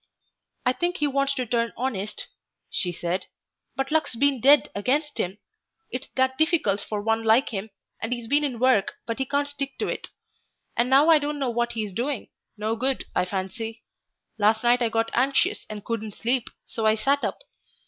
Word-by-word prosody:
"I 250 - +4
think 350 +5 -1
he 295 - +1
wants 275 0 +1
to 255 -2 -1
turn 235 0 0
honest," 215 -5 -2 0.5
she 180 - 0
said, 175 +2 -3 0.5
"but 270 +1 -2
luck's 315 -5 +1
been 275 0 +2
dead 285 +3 +6
against 285 +8 0
him.... 185 +3 -1 0.5
It's 255 +1 -4
that 260 +1 +1
difficult 315 - +2
for 210 0 -3
one 225 +1 +1
like 225 +4 +4
him, 210 -1 -4 0.3
and 225 - -3
he's 240 -2 -2
been 285 +5 +3
in 265 -5 -1
work, 250 -5 +3
but 230 +1 -3
he 265 - -1
can't 285 +1 +1
stick 280 -1 -5
to - - -1
it; - - -3 0.7
and 240 +1 +2
now 280 +5 +6
I 315 - +7
don't 295 0 -2
know 270 -4 0
what 240 0 0
he's 215 -4 -3
doing 250 +4 -2 0.3
no 215 +2 -1
good, 260 +3 0
I - - +2
fancy. 205 +5 -4 0.6
Last 215 +2 +3
night 240 +1 +4
I 235 - +2
got 225 0 0
anxious 265 +3 +2
and 210 -1 -7
couldn't 220 -3 -3
sleep, 245 +1 0 0.2
so 225 -1 -1
I 215 - +5
sat 275 +6 +1
up. - - -1
240 Hz, 190 wpm, -25 LUFS, 220-275 Hz, 0.7 s, I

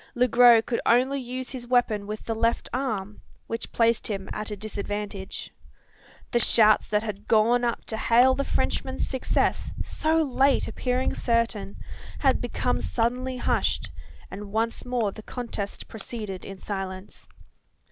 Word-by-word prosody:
Le 250 +1 +3
Gros 240 -1 +7
could 235 - -1
only 260 +4 +3
use 255 +1 -5
his 245 -2 -7
weapon 225 -5 +2
with 215 +1 -6
the 225 - -1
left 230 +1 0
arm; 215 -6 -3 0.2
which 230 0 -5
placed 230 -1 +2
him 195 -3 -4
at 215 0 -4
a 210 - -4
disadvantage. 205 -1 -5 0.8
The 240 - +3
shouts 215 -2 +5
that 210 0 +1
had 210 -2 -6
gone 230 +2 +4
up 235 -1 -1
to 220 - -3
hail 245 +4 +5
the 275 - -1
Frenchman's 265 -1 -1
success 260 -2 0
so 320 +1 0
late 275 0 +2
appearing 250 0 -1
certain 230 - 0 0.4
had - - +2
become - - -1
suddenly 250 - -1
hushed; - - 0 0.4
and 200 0 -7
once 225 +2 -1
more 240 -5 0
the 215 - -10
contest 215 -4 -5
proceeded 210 -3 -5
in 195 - -8
silence. 190 -1 -6
230 Hz, 145 wpm, -26 LUFS, 210-250 Hz, 0.8 s, Gros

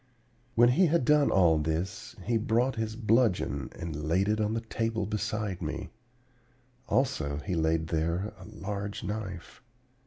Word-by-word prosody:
"When 120 +1 +6
he 175 +9 +4
had 160 -4 +2
done 150 0 +5
all 85 -4 +4
this, 90 +9 -3
he 120 - 0
brought 115 +4 +1
his 110 -1 -2
bludgeon 110 - +1
and 75 -2 -5
laid 95 +5 +2
it 110 +1 +1
on 105 +1 0
the 115 - -1
table 115 -1 -2
beside 105 -2 -2
me; - - -4 1.0
also 80 - 0
he 95 - -2
laid 80 -1 +1
there 85 +5 -1
a - - -11
large 100 -1 -5
knife. 100 -3 -5
105 Hz, 150 wpm, -29 LUFS, 85-115 Hz, 1.0 s, When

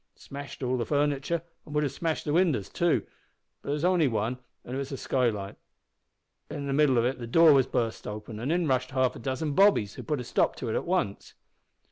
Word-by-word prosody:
Smashed 140 0 -9
all 130 0 0
the 120 - -1
furniture, 145 +3 0 0.2
an' 150 - -11
would 150 0 +2
have 140 - -1
smashed 160 +3 -2
the 150 - -1
winders 160 - +2
too, 170 -1 +1 0.6
but - - -15
there - - +1
was 150 +3 -1
only 180 -4 +3
one, 115 +1 -1 0.3
an' 125 - -7
it - - -2
was 140 0 -5
a 135 - -4
skylight. 110 -7 -1 0.9
In 145 -2 -5
the 140 - -1
middle 140 -3 +4
of 115 - +3
it 130 +1 -1
the 120 - -6
door 165 +5 +6
was 135 -2 +4
burst 115 -2 -2
open, 105 +1 -6
an' 125 +5 -3
in 170 0 +1
rushed 130 -1 +1
half 130 -1 +1
a - - -8
dozen 135 +5 -2
bobbies, 190 - +4
who - - -8
put 150 -3 -2
a - - -4
stop - - +1
to 120 - -5
it - - -1
at - - -1
once. 170 - -2
135 Hz, 230 wpm, -28 LUFS, 120-150 Hz, 0.9 s, door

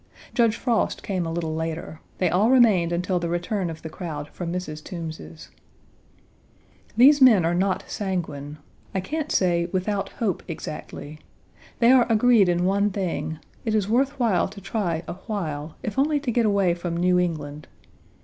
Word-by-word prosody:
Judge 230 -3 +3
Frost 235 -2 0
came 185 -4 -2
a - - -3
little 165 -1 -2
later. 160 0 -4 0.2
They 185 - +2
all 195 +7 +3
remained 215 -10 +5
until 180 +1 0
the 170 -1 -3
return 175 +2 -1
of 160 -1 -8
the - - -4
crowd 155 -4 -6
from 170 +1 -5
Mrs. 155 -4 -5
Toombs's. 165 -2 -8 1.5
These 280 +4 +7
men 220 -10 +7
are 170 - +1
not 185 +1 0
sanguine 155 -7 -4 0.4
I - - +2
can't 305 +10 -3
say, 170 -2 +2
without 195 +1 -1
hope, 210 -7 -1
exactly. 155 -2 -7 0.6
They 235 +1 +5
are 250 -2 +5
agreed 225 -3 +5
in 175 0 +1
one 200 +2 +2
thing: 165 -6 -3 0.3
it 220 -2 0
is 205 -3 +1
worth 270 +5 +1
while 225 -7 +2
to 200 +1 -11
try 185 -5 -2
a - - -4
while, 155 -8 -4
if 210 +3 -3
only 295 +1 +2
to 265 -4 -1
get 235 -1 +2
away 200 -4 +2
from 170 -1 -4
New 180 +1 +3
England. 150 -4 -3
180 Hz, 170 wpm, -24 LUFS, 165-215 Hz, 1.5 s, These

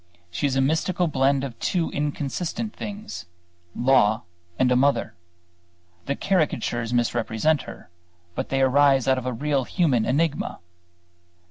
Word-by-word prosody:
She 145 - 0
is 135 - -1
a 135 - +3
mystical 165 +5 +1
blend 135 -1 +2
of 130 -4 -6
two 175 -3 0
inconsistent 150 +9 -3
things 210 +1 -7 0.5
law 120 -3 +3 0.3
and 125 -1 +3
a - - +4
mother. 140 +3 +2 0.9
The 140 - 0
caricatures 120 - 0
misrepresent 120 +4 +1
her; - - -12 0.4
but - - -4
they 135 0 +1
arise 135 0 +4
out 130 -1 +3
of 130 - -6
a - - 0
real 140 +2 0
human 130 - +1
enigma. 150 +3 0
135 Hz, 135 wpm, -24 LUFS, 125-155 Hz, 0.9 s, a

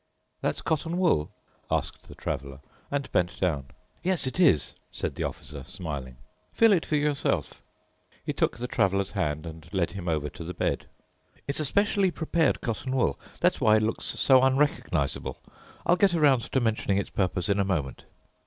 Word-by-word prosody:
"That's - - -1
cotton 165 +2 -1
wool?" 165 - +2 0.4
asked - - -2
the - - -11
Traveler 70 0 -5 0.3
and 140 -1 -2
bent 90 -1 0
down. 75 -8 0 0.3
"Yes, 180 -5 +1
it 130 +7 -3
is," 135 - +4 0.2
said - - -3
the - - -3
Officer 70 -2 -6
smiling, 70 -9 -6 0.3
"feel 225 -2 +5
it 175 - +1
for 155 - +1
yourself." 150 -1 0 0.6
He - - -1
took - - 0
the 120 - -4
Traveler's 100 -4 +1
hand 75 -6 -1
and 80 0 -10
led 90 -2 0
him 95 -3 -6
over 75 -2 0
to 85 - -8
the 90 +2 -6
bed. - - -1 0.6
"It's 140 - -1
a 155 - 0
specially 200 +3 +2
prepared 160 -3 +1
cotton 125 +3 -2
wool. 120 - +1 0.2
That's - - +2
why 110 0 +6
it 110 - +1
looks 110 +1 -1
so 130 -2 +5
unrecognizable. 130 - +1 0.5
I'll 175 - +4
get 195 -3 +4
around 140 -7 +3
to 130 - +3
mentioning 110 -4 +1
its 100 - -2
purpose 90 -2 0
in 100 0 +2
a - - +4
moment." 85 -9 -2
105 Hz, 175 wpm, -27 LUFS, -, 0.6 s, why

